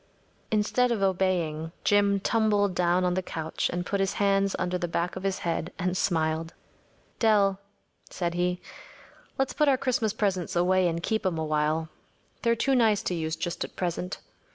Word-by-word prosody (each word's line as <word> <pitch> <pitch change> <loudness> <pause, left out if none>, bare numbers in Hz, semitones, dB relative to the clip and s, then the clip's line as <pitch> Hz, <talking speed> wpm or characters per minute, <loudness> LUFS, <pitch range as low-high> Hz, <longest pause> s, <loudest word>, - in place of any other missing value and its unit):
‚ÄĚ - - -36
Instead 220 +4 +2
of 215 -4 0
obeying, 175 -4 0
Jim 200 -1 +3
tumbled 205 -2 +2
down 180 +1 +2
on 180 - +1
the 185 - 0
couch 160 -3 -3
and 175 0 -3
put 200 - -1
his 195 0 +1
hands 195 -1 +2
under 180 0 -1
the 175 -1 -1
back 170 +1 -2
of 185 - -5
his 195 0 -1
head 170 +1 -1
and 180 -1 -1
smiled. 160 -2 0 0.6
‚ÄúDell,‚ÄĚ 205 -4 +4 0.5
said 170 -2 -2
he, 180 +1 0 0.8
“let’s 270 0 0
put 300 - +2
our 270 -2 +4
Christmas 250 -5 0
presents 190 -5 -1
away 180 +1 +3
and 170 0 -2
keep 220 +3 0
’em 180 -3 0
a 160 - -1
while. 155 +1 0 0.5
They’re 235 0 +2
too 270 +4 +1
nice 225 -5 +3
to - - -1
use 160 -1 -2
just 170 +1 -3
at - - -9
present. 180 +1 -3
185 Hz, 180 wpm, -27 LUFS, 170-205 Hz, 0.8 s, ÄúDell,‚ÄĚ